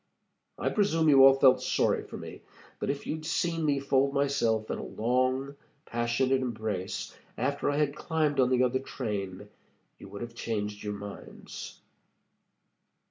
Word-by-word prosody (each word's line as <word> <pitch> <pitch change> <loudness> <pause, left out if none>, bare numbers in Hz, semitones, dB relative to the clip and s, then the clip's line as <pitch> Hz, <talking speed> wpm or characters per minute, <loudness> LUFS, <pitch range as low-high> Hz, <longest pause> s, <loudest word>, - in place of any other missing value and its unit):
I - - 0
presume 165 -7 +2
you 135 -2 +8
all 135 0 +9
felt 135 -1 +5
sorry - - +1
for - - -9
me, - - -9 0.4
but - - -2
if 140 0 -3
you'd 155 0 -4
seen 165 +1 -1
me 145 -2 +2
fold 140 0 +1
myself 115 -6 +1
in - - -3
a - - -5
long, 130 +4 0 0.3
passionate 120 +3 +1
embrace 110 -6 -3 0.2
after 140 +4 0
I 145 - 0
had 150 -1 +1
climbed 155 -3 0
on 125 -1 +4
the 130 0 +3
other 130 +1 +1
train, 105 -7 -5 0.5
you - - -11
would 100 +3 -7
have 120 0 -8
changed 105 -3 -3
your 105 -1 -3
minds." 100 0 -9
130 Hz, 155 wpm, -29 LUFS, 110-140 Hz, 0.5 s, all